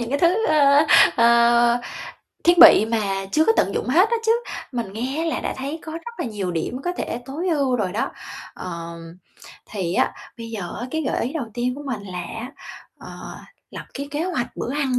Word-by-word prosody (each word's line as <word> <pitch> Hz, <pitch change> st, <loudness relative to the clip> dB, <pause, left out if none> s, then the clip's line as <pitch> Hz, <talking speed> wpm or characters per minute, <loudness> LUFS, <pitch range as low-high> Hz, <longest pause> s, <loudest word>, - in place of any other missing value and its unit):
những 235 Hz, -, -3 dB
cái 285 Hz, -, 0 dB
thứ, 370 Hz, +6 st, +2 dB
ơ, 290 Hz, 0 st, +5 dB, 0.3 s
ờ, 235 Hz, 0 st, +4 dB, 0.6 s
thiết 345 Hz, 0 st, +5 dB
bị 320 Hz, -11 st, +9 dB
mà 225 Hz, -1 st, 0 dB, 0.3 s
chưa 315 Hz, -, +4 dB
có 450 Hz, -, +4 dB
tận -, -, +1 dB
dụng -, -, -2 dB
hết 360 Hz, +10 st, +4 dB
á 470 Hz, -, +2 dB
chứ, 445 Hz, -, +5 dB, 0.4 s
mình 230 Hz, -6 st, -4 dB
nghe 260 Hz, +9 st, -3 dB
là 325 Hz, -, -1 dB
đã -, -, -3 dB
thấy 280 Hz, +4 st, -5 dB
có 315 Hz, -, -8 dB
rất 335 Hz, +9 st, -8 dB
là -, -, -1 dB
nhiều 205 Hz, -5 st, -3 dB
điểm 175 Hz, +9 st, -3 dB
có 355 Hz, -, -1 dB
thể -, -, -3 dB
tối 310 Hz, +7 st, -3 dB
ưu 280 Hz, -6 st, +1 dB
rồi 190 Hz, -6 st, -2 dB
đó. -, -, -1 dB, 0.4 s
Ờm, 170 Hz, -1 st, -8 dB, 0.5 s
thì 185 Hz, -4 st, -3 dB
á, -, -, +2 dB, 0.3 s
bây 230 Hz, 0 st, -7 dB
giờ 200 Hz, -6 st, -6 dB
á, 245 Hz, -, -4 dB
cái 315 Hz, +2 st, -2 dB
gợi 265 Hz, -, -1 dB
ý 250 Hz, -, -4 dB
đầu 315 Hz, -6 st, -3 dB
tiên 245 Hz, +1 st, -1 dB
của 290 Hz, -, -8 dB
mình 230 Hz, -6 st, -4 dB
là 185 Hz, -2 st, -7 dB
á, 230 Hz, +9 st, -7 dB, 0.5 s
ờ, -, -, -10 dB, 0.3 s
lập -, -, -8 dB
cái 280 Hz, +1 st, -5 dB
kế 300 Hz, +3 st, -2 dB
hoạch 330 Hz, -10 st, -3 dB
bữa 255 Hz, -, -3 dB
ăn 270 Hz, -4 st, 0 dB
250 Hz, 210 wpm, -22 LUFS, 225-310 Hz, 0.6 s, bị